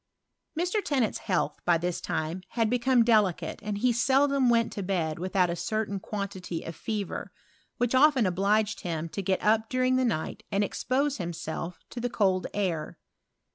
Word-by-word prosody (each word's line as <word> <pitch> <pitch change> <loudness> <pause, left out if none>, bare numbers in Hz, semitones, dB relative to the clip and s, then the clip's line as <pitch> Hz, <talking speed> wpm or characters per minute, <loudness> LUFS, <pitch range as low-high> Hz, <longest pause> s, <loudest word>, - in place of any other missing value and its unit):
Mr. 365 +4 0
Tennant's 260 -7 0
health, 185 -5 -1
by 175 -1 +4
this 175 +1 -2
time, 160 +4 -2
had 230 -2 0
become 250 0 +4
delicate, 215 -6 +2
and 210 -1 -3
he 245 +3 +2
seldom 270 +2 +3
went 230 -1 +2
to 200 - -4
bed 175 -5 -1
without 185 0 +1
a - - -2
c 215 - -3
tain 205 -2 -1
quantity 190 -4 -5
of 165 - -7
fever, 210 -4 -4 0.5
which 245 0 0
often 265 -3 +5
obliged 205 +4 +1
him 165 -2 -3
to 200 - -4
get 190 0 0
up 220 +1 +3
during 255 0 +2
the 260 - +2
night 225 -11 -2
and 200 0 +2
expose 275 +7 0
himself 170 -1 -5
to 245 - -5
the 245 +1 -1
cold 190 -5 +1
air. 175 -7 -2
210 Hz, 175 wpm, -28 LUFS, 180-245 Hz, 0.5 s, often